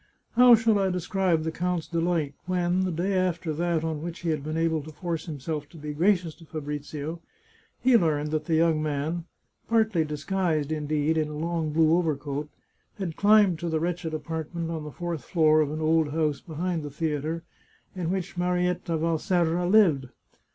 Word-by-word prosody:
How 245 Hz, 0 st, +8 dB
shall 225 Hz, -2 st, +2 dB
I 195 Hz, -1 st, +2 dB
describe 180 Hz, -2 st, 0 dB
the 160 Hz, -, -2 dB
count's 180 Hz, 0 st, -1 dB
delight 165 Hz, -4 st, 0 dB
when, 180 Hz, 0 st, +1 dB
the 185 Hz, -, -1 dB
day 175 Hz, +4 st, -1 dB
after 180 Hz, -3 st, 0 dB
that 170 Hz, 0 st, 0 dB
on 160 Hz, -2 st, -2 dB
which 170 Hz, +1 st, -6 dB
he 170 Hz, -, -2 dB
had 155 Hz, -3 st, -1 dB
been 155 Hz, +2 st, -3 dB
able 165 Hz, -1 st, +1 dB
to 155 Hz, +2 st, -10 dB
force 170 Hz, +1 st, -4 dB
himself 150 Hz, 0 st, -4 dB
to 165 Hz, -, -14 dB
be 150 Hz, -1 st, -5 dB
gracious 175 Hz, 0 st, +2 dB
to 165 Hz, -, -15 dB
Fabrizio, 150 Hz, +1 st, -5 dB, 0.6 s
he 255 Hz, -1 st, +4 dB
learned 150 Hz, -7 st, +2 dB
that 155 Hz, -1 st, -1 dB
the 160 Hz, -, +1 dB
young 160 Hz, -1 st, +3 dB
man 155 Hz, +3 st, -2 dB, 0.2 s
— -, -, -42 dB
partly 220 Hz, -7 st, +3 dB
disguised, 155 Hz, 0 st, -1 dB
indeed, 155 Hz, +1 st, 0 dB
in 155 Hz, -, 0 dB
a 150 Hz, 0 st, -6 dB
long 165 Hz, -1 st, -1 dB
blue 160 Hz, +1 st, +4 dB
over 165 Hz, -4 st, +1 dB
coat— 145 Hz, +1 st, -5 dB, 0.5 s
had 180 Hz, -6 st, -4 dB
climbed 205 Hz, -5 st, +5 dB
to 170 Hz, -, -3 dB
the 160 Hz, -1 st, 0 dB
wretched 170 Hz, 0 st, -2 dB
apartment 160 Hz, +2 st, -4 dB
on 160 Hz, -2 st, -4 dB
the 150 Hz, -, -7 dB
fourth 170 Hz, -1 st, -4 dB
floor 155 Hz, -2 st, +4 dB
of 150 Hz, -, 0 dB
an 155 Hz, +1 st, -4 dB
old 160 Hz, -1 st, +3 dB
house 150 Hz, -1 st, 0 dB
behind 170 Hz, 0 st, -3 dB
the 145 Hz, -, -6 dB
theatre, 155 Hz, +2 st, -2 dB, 0.5 s
in 175 Hz, -3 st, -2 dB
which 190 Hz, 0 st, -3 dB
Marietta 180 Hz, -1 st, 0 dB
Valserra 170 Hz, +2 st, +1 dB
lived. 170 Hz, -11 st, +4 dB
165 Hz, 185 wpm, -26 LUFS, 155-180 Hz, 0.6 s, How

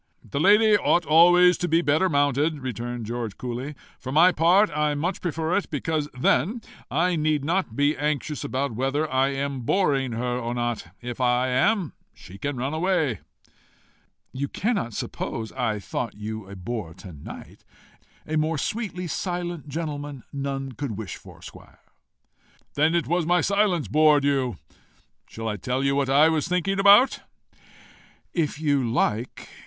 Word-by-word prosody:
"The 140 Hz, -, -3 dB
lady 210 Hz, +5 st, +5 dB
ought 175 Hz, -3 st, +2 dB
always 175 Hz, +3 st, +6 dB
to 175 Hz, -, -1 dB
be 165 Hz, -, +3 dB
the 170 Hz, -, +1 dB
better 155 Hz, +6 st, +2 dB
mounted," 145 Hz, +1 st, +1 dB
returned 120 Hz, -2 st, -4 dB
George 115 Hz, -2 st, -4 dB
coolly. 125 Hz, +4 st, -5 dB, 0.2 s
"For 130 Hz, -, -6 dB
my 165 Hz, +6 st, +6 dB
part, 175 Hz, +2 st, +3 dB
I 150 Hz, -1 st, +1 dB
much 175 Hz, +6 st, -2 dB
prefer 165 Hz, 0 st, -1 dB
it, 200 Hz, -, -1 dB
because 150 Hz, 0 st, -2 dB
then 200 Hz, -, +1 dB, 0.3 s
I 175 Hz, +5 st, +1 dB
need 155 Hz, -2 st, 0 dB
not 170 Hz, -, -1 dB
be 145 Hz, +3 st, +2 dB
anxious 150 Hz, +1 st, -2 dB
about 140 Hz, -1 st, -2 dB
whether 135 Hz, +6 st, -1 dB
I 130 Hz, +1 st, +3 dB
am 140 Hz, 0 st, -3 dB
boring 135 Hz, -3 st, +1 dB
her 125 Hz, +2 st, -2 dB
or 120 Hz, 0 st, -3 dB
not: 120 Hz, -5 st, -2 dB
if 120 Hz, +1 st, -6 dB
I 125 Hz, +1 st, +2 dB
am, 185 Hz, -, +1 dB, 0.2 s
she 95 Hz, +2 st, -13 dB
can 140 Hz, +2 st, -3 dB
run 135 Hz, +4 st, -2 dB
away." 160 Hz, -, 0 dB, 1.1 s
"You 140 Hz, +2 st, -2 dB
cannot 185 Hz, -, -2 dB
suppose 110 Hz, -2 st, -4 dB
I 120 Hz, -5 st, -1 dB
thought 110 Hz, +3 st, -4 dB
you 105 Hz, -1 st, -6 dB
a 100 Hz, -, -8 dB
bore 95 Hz, -3 st, -5 dB
to 95 Hz, -4 st, -11 dB
night. 75 Hz, -, -11 dB, 0.6 s
A 155 Hz, -, -2 dB
more 155 Hz, +1 st, 0 dB
sweetly 195 Hz, +1 st, -3 dB
silent 175 Hz, -1 st, -4 dB
gentleman 145 Hz, -3 st, -5 dB
none 135 Hz, -1 st, -3 dB
could 125 Hz, -4 st, -5 dB
wish 110 Hz, -4 st, -6 dB
for -, -, -15 dB
squire." -, -, -14 dB, 0.9 s
"Then 155 Hz, +3 st, +2 dB
it 170 Hz, -, +1 dB
was 175 Hz, -1 st, 0 dB
my 175 Hz, 0 st, +3 dB
silence 200 Hz, -6 st, +1 dB
bored 150 Hz, -1 st, +4 dB
you. 135 Hz, -4 st, 0 dB, 0.7 s
Shall 115 Hz, 0 st, -6 dB
I 105 Hz, -1 st, -2 dB
tell 125 Hz, +7 st, -2 dB
you 140 Hz, 0 st, +2 dB
what 140 Hz, -1 st, 0 dB
I 145 Hz, +3 st, +6 dB
was 160 Hz, -2 st, 0 dB
thinking 180 Hz, +2 st, 0 dB
about?" 205 Hz, +6 st, +6 dB, 1.1 s
"If 155 Hz, -4 st, -1 dB
you 145 Hz, -4 st, +1 dB
like. 115 Hz, 0 st, -1 dB
145 Hz, 160 wpm, -25 LUFS, 125-170 Hz, 1.1 s, always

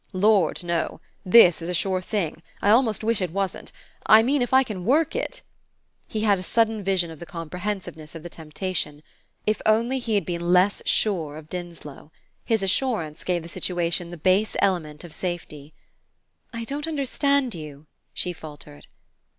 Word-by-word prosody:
"Lord, 190 Hz, -3 st, +3 dB
no. 170 Hz, -2 st, -2 dB, 0.2 s
This 180 Hz, -4 st, +7 dB
is 165 Hz, -, -4 dB
a 180 Hz, -, 0 dB
sure 185 Hz, +1 st, 0 dB
thing 175 Hz, -5 st, -2 dB, 0.2 s
I 205 Hz, -, +3 dB
almost 225 Hz, -3 st, +3 dB
wish 225 Hz, -2 st, +1 dB
it 180 Hz, -, 0 dB
wasn't; 195 Hz, +2 st, -3 dB, 0.4 s
I 220 Hz, +1 st, +8 dB
mean 275 Hz, +3 st, +2 dB
if 245 Hz, -, -1 dB
I 265 Hz, 0 st, +6 dB
can 210 Hz, -8 st, -6 dB
work 300 Hz, -, +2 dB
it -, -, -3 dB, 0.3 s
" -, -, -46 dB
He 215 Hz, -, -3 dB
had 205 Hz, -3 st, +3 dB
a -, -, -4 dB
sudden 220 Hz, +1 st, +1 dB
vision 185 Hz, -3 st, +1 dB
of 160 Hz, -, -11 dB
the 170 Hz, -, -8 dB
comprehensiveness 170 Hz, -2 st, -5 dB
of 160 Hz, -, -8 dB
the -, -, -6 dB
temptation. 155 Hz, -2 st, -4 dB, 0.4 s
If 215 Hz, 0 st, 0 dB
only 230 Hz, +5 st, +2 dB
he 230 Hz, -3 st, -1 dB
had 200 Hz, -, +1 dB
been 170 Hz, -1 st, -3 dB
less 185 Hz, +3 st, +4 dB
sure 165 Hz, -8 st, +1 dB
of 155 Hz, 0 st, -12 dB
Dinslow! 170 Hz, -4 st, -8 dB, 0.3 s
His 220 Hz, -3 st, +1 dB
assurance 195 Hz, -, 0 dB
gave 175 Hz, -2 st, -1 dB
the -, -, -8 dB
situation 175 Hz, 0 st, -2 dB
the 175 Hz, -, -8 dB
base 190 Hz, +6 st, +2 dB
element 160 Hz, -6 st, 0 dB
of 170 Hz, -3 st, -10 dB
safety. 160 Hz, -5 st, -5 dB, 0.8 s
"I 230 Hz, -2 st, -5 dB
don't 285 Hz, +6 st, -3 dB
understand 280 Hz, -3 st, +1 dB
you," 150 Hz, -3 st, -9 dB, 0.3 s
she 180 Hz, -, -2 dB
faltered. 150 Hz, -2 st, -12 dB
185 Hz, 175 wpm, -24 LUFS, 165-220 Hz, 0.8 s, I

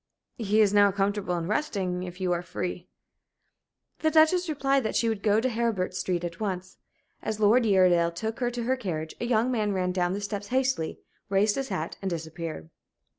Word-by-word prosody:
"He 215 Hz, -1 st, +3 dB
is 205 Hz, -1 st, +4 dB
now 205 Hz, -1 st, +6 dB
comfortable 200 Hz, -1 st, -1 dB
and 170 Hz, -1 st, -3 dB
resting. 195 Hz, -7 st, -1 dB
If 180 Hz, 0 st, -7 dB
you 185 Hz, -1 st, 0 dB
are 175 Hz, -1 st, 0 dB
free 180 Hz, 0 st, -5 dB, 0.6 s
" -, -, -51 dB
The 315 Hz, -, +2 dB
Duchess 320 Hz, +3 st, +4 dB
replied 275 Hz, -2 st, +1 dB
that 220 Hz, -, -3 dB
she 230 Hz, -, +2 dB
would 220 Hz, -3 st, -1 dB
go 210 Hz, 0 st, +3 dB
to 245 Hz, -, +1 dB
Heribert 225 Hz, -6 st, -1 dB
Street 180 Hz, -1 st, -2 dB
at 170 Hz, 0 st, -5 dB
once. 185 Hz, -3 st, -4 dB, 0.4 s
As 215 Hz, -1 st, -3 dB
Lord 225 Hz, +3 st, +4 dB
Uredale 180 Hz, -4 st, +4 dB
took 220 Hz, +7 st, -4 dB
her 245 Hz, -1 st, +1 dB
to 240 Hz, -1 st, -4 dB
her 255 Hz, +3 st, +1 dB
carriage 165 Hz, -10 st, -4 dB
a -, -, 0 dB
young 240 Hz, +1 st, +2 dB
man 215 Hz, -4 st, 0 dB
ran 180 Hz, -1 st, 0 dB
down 180 Hz, -1 st, 0 dB
the 200 Hz, -, -3 dB
steps 205 Hz, 0 st, -4 dB
hastily, 255 Hz, -8 st, 0 dB, 0.3 s
raised 200 Hz, +2 st, +3 dB
his 270 Hz, -1 st, -3 dB
hat, 170 Hz, -4 st, -3 dB
and 195 Hz, -, -2 dB
disappeared. 160 Hz, -, -6 dB
200 Hz, 200 wpm, -27 LUFS, 180-230 Hz, 0.6 s, now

